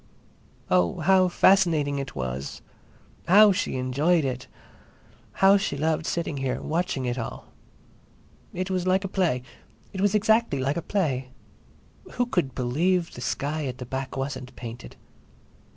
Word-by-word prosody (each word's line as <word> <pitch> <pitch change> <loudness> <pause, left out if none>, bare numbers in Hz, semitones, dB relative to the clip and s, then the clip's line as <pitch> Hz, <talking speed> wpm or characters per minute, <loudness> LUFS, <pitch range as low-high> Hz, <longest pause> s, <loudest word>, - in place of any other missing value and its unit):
Oh, 90 - +2
how 185 +2 +4
fascinating 170 -6 +3
it 135 -2 -6
was! 65 0 -5 0.6
How 205 +3 +7
she 185 - -1
enjoyed 140 +6 +1
it! 130 -1 -4 0.9
How 195 +1 +5
she 170 -7 -2
loved 160 +2 0
sitting 165 -4 -2
here, 135 -2 -2
watching 155 -5 -2
it 125 +1 -2
all! 115 - -7 1.0
It 185 +1 -4
was 185 -1 -1
like 190 +2 +2
a - - -2
play. 175 -10 0 0.5
It 190 - -4
was 205 +1 +2
exactly 220 - +2
like 135 +2 0
a 170 - -2
play. 140 -10 -1 0.8
Who 245 - +1
could 175 - -1
believe 165 +8 0
the 125 - -9
sky 145 +4 -2
at 125 -1 -5
the 125 - -7
back 130 +2 -5
wasn't 135 -1 -5
painted? 115 - -9
150 Hz, 145 wpm, -25 LUFS, 130-185 Hz, 1.0 s, How